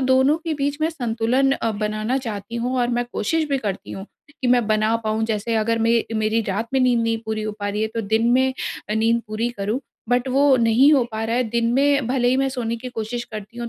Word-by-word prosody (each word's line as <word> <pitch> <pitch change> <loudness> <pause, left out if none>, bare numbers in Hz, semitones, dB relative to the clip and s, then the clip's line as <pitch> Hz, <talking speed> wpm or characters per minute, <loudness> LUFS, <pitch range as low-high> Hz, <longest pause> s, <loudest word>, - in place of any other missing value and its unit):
दोनों 265 +3 +3
के 325 - -1
बीच 285 +2 -1
में 315 - +2
संतुलन 245 -1 0
अ, 225 - -1
बनाना 215 +4 -2
चाहती 225 -2 -6
हूँ। 245 +2 -1
और 240 - +1
मैं 240 0 0
कोशिश 320 +9 0
भी 275 -1 +1
करती 200 -5 -4
हूँ 195 - -6 0.4
कि 255 - -1
मैं 245 -3 +3
बना 215 +1 +2
पाऊँ 215 +1 0
जैसे 220 +1 -2
अगर 230 +1 +1
मेरी 230 0 +1
मेरी 215 +1 +1
रात 220 +4 -2
में 265 - +3
नींद 245 -2 +3
नहीं 225 0 0
पूरी 220 -1 -2
हो 215 0 -3
पा 205 - -1
रही 210 +1 -2
है 220 - 0
तो 230 - 0
दिन 220 +2 +1
में 260 +1 +3 0.4
अ, 210 - -1
नींद 230 +2 +2
पूरी 215 +3 -2
करूँ 210 +7 -1 0.3
बट 245 +1 +1
वो 275 0 +4
नहीं 240 +5 +5
हो 265 -5 +4
पा 220 0 -3
रहा 230 +2 -1
है 250 - +2
दिन 235 0 +1
में 280 -2 +3
भले 245 -1 +1
ही 255 - +3
मैं 270 0 +1
सोने 235 -3 -3
की 250 +2 -7
कोशिश 240 0 -4
करती 215 +2 -8
हूँ 235 -1 -4
235 Hz, 245 wpm, -22 LUFS, 220-260 Hz, 0.4 s, नहीं